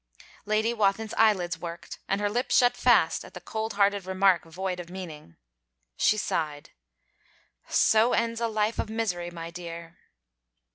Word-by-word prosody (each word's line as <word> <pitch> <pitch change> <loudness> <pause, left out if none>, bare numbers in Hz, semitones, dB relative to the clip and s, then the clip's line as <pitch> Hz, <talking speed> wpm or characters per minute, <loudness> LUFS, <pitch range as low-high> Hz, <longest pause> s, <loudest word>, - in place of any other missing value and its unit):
Lady 215 +2 +1
Wathin's 215 0 0
eyelids 190 -6 +2
worked 170 0 -8
and 195 - 0
her 205 - +1
lips 240 +5 +1
shut 245 -1 +4
fast 230 -10 +3
at - - -14
the - - -6
cold 220 +5 -4
hearted 200 -1 +1
remark 190 -2 +3
void 180 +2 -4
of 175 -1 -8
meaning. 160 - -9 0.6
She 215 - +3
sighed. 150 -7 -3 1.0
'So 225 +2 +4
ends 230 0 0
a 230 - +1
life 215 0 -1
of - - -2
misery, 200 -6 -2
my 165 -1 -8
dear!' 170 -1 -9
195 Hz, 150 wpm, -27 LUFS, 175-220 Hz, 1.0 s, shut